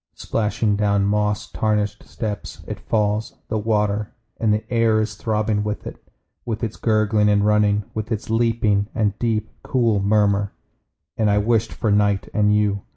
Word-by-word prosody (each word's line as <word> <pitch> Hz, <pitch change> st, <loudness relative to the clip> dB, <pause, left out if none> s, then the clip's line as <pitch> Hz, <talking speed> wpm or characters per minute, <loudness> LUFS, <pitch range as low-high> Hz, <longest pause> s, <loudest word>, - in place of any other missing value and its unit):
Splashing 105 Hz, -1 st, 0 dB
down 100 Hz, -1 st, +2 dB
moss 105 Hz, +1 st, 0 dB
tarnished 105 Hz, -1 st, -1 dB
steps 105 Hz, -3 st, -5 dB
It -, -, -5 dB
falls, 105 Hz, 0 st, -1 dB
the 110 Hz, -, 0 dB
water; 105 Hz, -1 st, 0 dB, 0.2 s
And 110 Hz, -2 st, +2 dB
the 105 Hz, +1 st, 0 dB
air 115 Hz, -2 st, +3 dB
is 110 Hz, 0 st, -1 dB
throbbing 105 Hz, 0 st, -1 dB
with 105 Hz, 0 st, -4 dB
it. -, -, -9 dB, 0.4 s
With 115 Hz, -1 st, -4 dB
its 110 Hz, -2 st, -2 dB
gurgling 110 Hz, -1 st, +2 dB
and 105 Hz, 0 st, +3 dB
running. 105 Hz, -1 st, +3 dB
With 110 Hz, +1 st, -4 dB
its 110 Hz, -2 st, -2 dB
leaping, 110 Hz, -3 st, +1 dB
and 105 Hz, -2 st, 0 dB
deep, 110 Hz, -2 st, -1 dB
cool 115 Hz, -5 st, +1 dB
murmur. 100 Hz, 0 st, +2 dB, 0.6 s
And 110 Hz, -2 st, +2 dB
I 100 Hz, -, +3 dB
wished 115 Hz, +1 st, +1 dB
for 110 Hz, -, -1 dB
night 100 Hz, -1 st, +2 dB
and 105 Hz, -1 st, +3 dB
you. 105 Hz, -1 st, +2 dB
105 Hz, 160 wpm, -22 LUFS, 105-110 Hz, 0.6 s, air